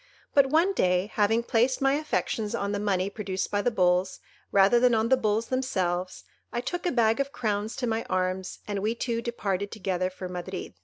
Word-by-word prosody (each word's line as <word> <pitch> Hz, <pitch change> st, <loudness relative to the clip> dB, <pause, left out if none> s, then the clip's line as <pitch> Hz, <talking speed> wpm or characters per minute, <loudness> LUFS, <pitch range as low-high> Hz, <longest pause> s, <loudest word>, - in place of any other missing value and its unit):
But 280 Hz, -1 st, +5 dB
one 330 Hz, +7 st, +3 dB
day, 180 Hz, -, +1 dB
having 220 Hz, +3 st, +2 dB
placed 240 Hz, +3 st, +2 dB
my 270 Hz, 0 st, +3 dB
affections 280 Hz, -7 st, -1 dB
on 200 Hz, -, -2 dB
the 205 Hz, -, -1 dB
money 195 Hz, -2 st, 0 dB
produced 195 Hz, -2 st, -4 dB
by 205 Hz, -, +1 dB
the 245 Hz, -, +2 dB
bulls, 185 Hz, -3 st, +1 dB, 0.3 s
rather 200 Hz, +4 st, +5 dB
than 245 Hz, -1 st, +4 dB
on 220 Hz, +1 st, +1 dB
the 260 Hz, -, +6 dB
bulls 220 Hz, -2 st, 0 dB
themselves, 185 Hz, -9 st, -1 dB, 0.3 s
I 240 Hz, -, -2 dB
took 350 Hz, +8 st, -3 dB
a -, -, +1 dB
bag 225 Hz, -1 st, +2 dB
of 275 Hz, 0 st, -1 dB
crowns 215 Hz, -3 st, -2 dB
to 250 Hz, -, -2 dB
my 225 Hz, -1 st, -1 dB
arms, 185 Hz, 0 st, -2 dB
and 205 Hz, -1 st, -2 dB
we 215 Hz, +4 st, -1 dB
two 230 Hz, 0 st, -2 dB
departed 200 Hz, -4 st, -2 dB
together 185 Hz, -4 st, -2 dB
for 185 Hz, 0 st, -7 dB
Madrid. 180 Hz, +1 st, -6 dB
210 Hz, 200 wpm, -27 LUFS, 190-240 Hz, 0.3 s, the